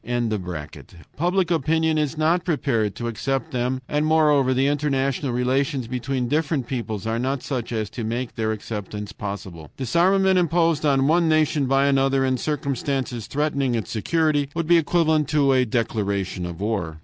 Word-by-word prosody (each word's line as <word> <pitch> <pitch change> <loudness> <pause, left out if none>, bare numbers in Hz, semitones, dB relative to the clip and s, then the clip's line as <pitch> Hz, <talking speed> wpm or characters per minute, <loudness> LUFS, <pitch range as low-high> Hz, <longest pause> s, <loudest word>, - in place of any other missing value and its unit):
] - - -40 1.1
Public 175 +3 +1
opinion 160 0 +1
is 150 +1 -1
not 165 +3 +2
prepared 135 - 0
to 120 - -4
accept 130 +3 -2
them, 125 +1 -2
and 150 0 0
moreover, 150 -4 +3
the 130 +1 +2
international 140 -2 0
relations 130 +1 0
between 125 +1 -2
different 150 -1 0
peoples 115 -6 -4
are 115 +1 -1
not 130 +1 -2
such 125 -5 -4
as 110 -2 -2
to 120 - -5
make 120 +3 -3
their 110 -1 -1
acceptance 105 -1 -5
possible. 95 -7 -7
Disarmament 185 - +3
imposed 165 -2 +2
on 135 -1 +3
one 165 +1 +3
nation 155 -3 +2
by 135 +1 +3
another 135 -1 +2
in 130 -1 +1
circumstances 135 -4 -2
threatening 140 -4 0
its 110 - -3
security 145 +4 +1
would 165 -1 -1
be 170 +2 +5
equivalent 160 -2 +2
to 145 -3 +3
a 130 -1 +3
declaration 100 -6 -2
of 85 -1 -8
war. 100 -7 -2
135 Hz, 160 wpm, -23 LUFS, 115-155 Hz, 1.1 s, be